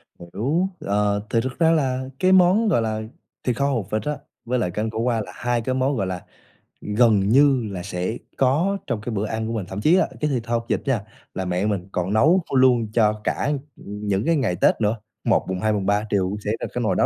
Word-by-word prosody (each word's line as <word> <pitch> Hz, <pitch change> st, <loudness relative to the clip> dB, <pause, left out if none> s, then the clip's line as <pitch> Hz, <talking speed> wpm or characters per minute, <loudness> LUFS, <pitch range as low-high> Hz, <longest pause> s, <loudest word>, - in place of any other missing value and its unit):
H -, -, -43 dB, 0.2 s
hiểu, 150 Hz, -, +1 dB
ờ, 105 Hz, 0 st, 0 dB
thì 115 Hz, -, +2 dB
thực 130 Hz, +5 st, -5 dB
ra 165 Hz, -1 st, +5 dB
là 130 Hz, -5 st, +1 dB, 0.2 s
cái 185 Hz, 0 st, +3 dB
món, 190 Hz, +4 st, +5 dB
gọi 120 Hz, -, +3 dB
là, 110 Hz, -1 st, -2 dB, 0.4 s
thịt 125 Hz, -2 st, 0 dB
kho 140 Hz, -, +1 dB
hột 115 Hz, -8 st, -1 dB
vịt 110 Hz, -, 0 dB
á, 150 Hz, -2 st, -2 dB, 0.3 s
với 125 Hz, +1 st, 0 dB
lại 90 Hz, -6 st, -1 dB
canh 110 Hz, +4 st, -2 dB
khổ 110 Hz, -, -6 dB
qua 115 Hz, -2 st, +1 dB
là 90 Hz, -, -8 dB
hai 120 Hz, -1 st, -1 dB
cái 130 Hz, +3 st, -2 dB
món, 130 Hz, +2 st, +1 dB
gọi 95 Hz, -3 st, -1 dB
là, 90 Hz, -1 st, -5 dB, 0.6 s
ừm, 105 Hz, -, -4 dB
gần 115 Hz, -3 st, +5 dB
như 130 Hz, -3 st, +4 dB
là 90 Hz, -2 st, -5 dB
sẽ 90 Hz, +7 st, -3 dB, 0.2 s
có 160 Hz, +10 st, +2 dB
trong 115 Hz, -5 st, -2 dB
cái 120 Hz, +1 st, -4 dB
bữa 100 Hz, -, -1 dB
ăn 110 Hz, +1 st, -3 dB
của 115 Hz, -, -3 dB
mình. 105 Hz, -5 st, -3 dB
Thậm 95 Hz, +2 st, -5 dB
chí 165 Hz, +8 st, +5 dB
là 190 Hz, -, +2 dB
cái 150 Hz, -, +1 dB
thịt 125 Hz, -4 st, -1 dB
kho 120 Hz, -, -2 dB
hột 115 Hz, 0 st, 0 dB
vịt -, -, 0 dB
nha, 125 Hz, -7 st, +1 dB, 0.3 s
là 95 Hz, -, -3 dB
mẹ 90 Hz, +3 st, -1 dB
mình 100 Hz, -3 st, -1 dB
còn 90 Hz, +2 st, -1 dB
nấu 160 Hz, +11 st, +4 dB
ph -, -, -7 dB
luôn 125 Hz, -4 st, +4 dB
cho 105 Hz, -2 st, +2 dB
cả, 145 Hz, -, 0 dB, 0.2 s
ừm, 105 Hz, +1 st, -8 dB
những 100 Hz, +2 st, 0 dB
cái 165 Hz, -, +3 dB
ngày 115 Hz, -, 0 dB
Tết -, -, +3 dB
nữa, 105 Hz, +2 st, +2 dB, 0.3 s
1, -, -, +2 dB
mùng 95 Hz, -1 st, -2 dB
2, 110 Hz, +2 st, +1 dB
mùng 100 Hz, -2 st, -1 dB
3 105 Hz, +2 st, +1 dB
đều 100 Hz, -2 st, +2 dB
cũng 105 Hz, +1 st, -4 dB
sẽ 105 Hz, -, 0 dB
là -, -, -3 dB
cái 125 Hz, -, -2 dB
nồi 110 Hz, -, +1 dB
đó -, -, +3 dB
115 Hz, 265 wpm, -23 LUFS, 105-130 Hz, 0.6 s, ra